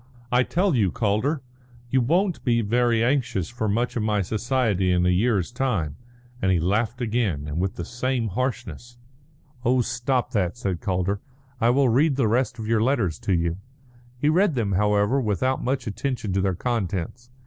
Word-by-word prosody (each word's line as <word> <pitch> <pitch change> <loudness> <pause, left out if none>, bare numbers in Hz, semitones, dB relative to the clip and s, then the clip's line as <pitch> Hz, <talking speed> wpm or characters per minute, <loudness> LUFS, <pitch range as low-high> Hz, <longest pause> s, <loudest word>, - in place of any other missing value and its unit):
I 125 +1 +4
tell 180 +7 +1
you, 105 -6 +3
Calder, 120 +7 0 0.5
you 130 - +3
won't 175 +8 +1
be 120 -2 +2
very 115 +1 +2
anxious 120 - 0
for 120 -3 -2
much 120 +4 0
of 120 - 0
my 105 -2 +1
society 110 -3 0
in 90 0 +2
a - - +3
year's 100 +1 +1
time," 115 - -1 0.5
and 95 - +2
he 90 - +3
laughed 110 +8 0
again 110 -11 -1
and 75 +2 -3
with 95 +4 -1
the - - -5
same 120 -1 -1
harshness. 120 +1 -4 0.7
"Oh, 125 +1 +3
stop 125 +2 -1
that," 95 -1 0
said 95 -7 -3
Calder; 95 +1 -1 0.4
"I 115 0 +3
will 135 +1 +3
read 140 +5 +3
the 130 -4 +2
rest 125 +2 0
of 110 - -5
your 110 0 +2
letters 115 - +1
to 95 - -1
you." 85 +1 -1 0.6
He 145 - 0
read 170 +1 +3
them, 110 -5 0
however, 105 +6 +2
without 120 +4 0
much 130 0 -1
attention 115 -1 -3
to 95 - +1
their 95 -1 0
contents. 115 +1 -3
115 Hz, 180 wpm, -24 LUFS, 100-125 Hz, 0.7 s, I